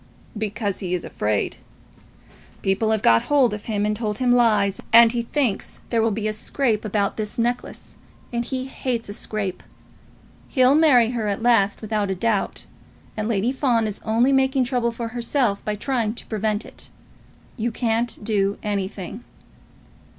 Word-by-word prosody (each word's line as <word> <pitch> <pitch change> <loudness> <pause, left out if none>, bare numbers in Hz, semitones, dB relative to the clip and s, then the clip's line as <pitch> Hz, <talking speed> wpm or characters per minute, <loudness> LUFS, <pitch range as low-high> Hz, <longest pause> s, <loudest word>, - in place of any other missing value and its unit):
"Because 210 -1 -3
he 180 -2 -2
is 175 - -5
afraid. 105 -1 -1 1.1
People 195 +3 +1
have 220 -1 +1
got 115 0 +5
hold 270 -6 +3
of 210 0 -6
him 210 -2 -1
and 210 0 0
told 210 -1 -2
him 250 -1 +2
lies, 215 -5 +3
and 230 0 +8
he 240 0 -1
thinks 235 -3 -1
there 230 -2 +2
will 225 - +2
be 215 0 -2
a 215 - -1
scrape 220 0 -1
about 205 -1 -1
this 210 -1 -4
necklace, 240 +1 -3 0.4
and 235 0 0
he 260 +1 -3
hates 250 -4 -3
a - - -5
scrape. 205 -4 -3 0.9
He'll 255 -1 +4
marry 270 -7 +5
her 230 -4 -2
at 205 +2 -2
last, 220 -4 +3
without 210 -2 -1
a 190 - -1
doubt, 210 +1 -1 0.5
and 215 0 -2
Lady 225 +1 +1
Fawn 250 -4 +1
is 210 -2 -4
only 235 +5 +2
making 265 0 +3
trouble 245 -2 0
for 230 0 -5
herself 235 -2 0
by 210 - -2
trying 230 -1 -1
to - - -7
prevent 215 0 -2
it. - - -12 0.7
You 235 -1 -2
can't 230 0 -1
do 200 -2 0
anything." 200 +1 -4
225 Hz, 165 wpm, -23 LUFS, 205-240 Hz, 1.1 s, and